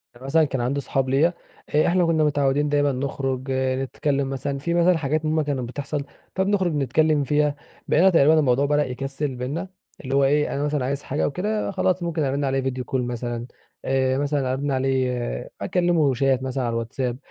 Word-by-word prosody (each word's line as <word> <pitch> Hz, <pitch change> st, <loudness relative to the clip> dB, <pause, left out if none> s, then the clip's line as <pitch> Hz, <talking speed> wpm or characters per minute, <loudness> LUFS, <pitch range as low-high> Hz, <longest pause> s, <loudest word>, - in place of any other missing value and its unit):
يعني 130 Hz, +2 st, -12 dB
مثلًا 160 Hz, +3 st, +3 dB
كان 135 Hz, -3 st, -2 dB
عندي 140 Hz, +4 st, -1 dB
صحاب 135 Hz, 0 st, -1 dB
ليا 155 Hz, +6 st, +3 dB, 0.4 s
آآ، 155 Hz, -, +4 dB
إحنا 175 Hz, 0 st, +3 dB
كنا 160 Hz, -2 st, +2 dB
متعودين 145 Hz, 0 st, +1 dB
دايمًا 145 Hz, -1 st, +2 dB
نخرج 135 Hz, 0 st, -3 dB
نتكلم 135 Hz, +1 st, -1 dB
مثلًا، 135 Hz, +1 st, -3 dB
في 170 Hz, +4 st, -2 dB
مثلًا 175 Hz, 0 st, +4 dB
حاجات 155 Hz, +1 st, -1 dB
هم 155 Hz, 0 st, +1 dB
كانت 145 Hz, -3 st, -2 dB
بتحصل 145 Hz, +1 st, -4 dB, 0.3 s
فبنخرج 190 Hz, -3 st, +1 dB
نتكلم 145 Hz, +2 st, +2 dB
فيها، 150 Hz, +1 st, +1 dB, 0.3 s
بقينا 185 Hz, +5 st, +5 dB
تقريبًا 160 Hz, -2 st, +5 dB
الموضوع 135 Hz, 0 st, +3 dB
بدأ 150 Hz, 0 st, +2 dB
يكسل 135 Hz, +2 st, -3 dB
بيننا 145 Hz, +10 st, -4 dB, 0.4 s
اللي 135 Hz, +1 st, -2 dB
هو 140 Hz, -, +4 dB
إيه 150 Hz, +2 st, +2 dB
أنا 140 Hz, -, -1 dB
مثلًا 145 Hz, -3 st, 0 dB
عايز 140 Hz, +1 st, -2 dB
حاجة 145 Hz, -, -2 dB
أو -, -, +1 dB
كده 210 Hz, +5 st, -2 dB
خلاص 185 Hz, -2 st, 0 dB
ممكن 165 Hz, -3 st, -1 dB
أرن 140 Hz, +1 st, 0 dB
عليه 135 Hz, 0 st, 0 dB
فيديو 130 Hz, -1 st, -3 dB
كول 125 Hz, +1 st, -2 dB
مثلًا، 120 Hz, 0 st, -4 dB, 0.4 s
آآ 130 Hz, 0 st, +1 dB
مثلًا 140 Hz, -2 st, 0 dB
أرن 140 Hz, +1 st, -2 dB
عليه 130 Hz, -, -1 dB
أكلمه 170 Hz, -6 st, +2 dB
شات 135 Hz, 0 st, +1 dB
مثلًا 130 Hz, 0 st, -2 dB
على 120 Hz, -1 st, -1 dB
الواتس 115 Hz, +3 st, -4 dB
آب، 125 Hz, -1 st, 0 dB
140 Hz, 190 wpm, -23 LUFS, 130-155 Hz, 0.4 s, بقينا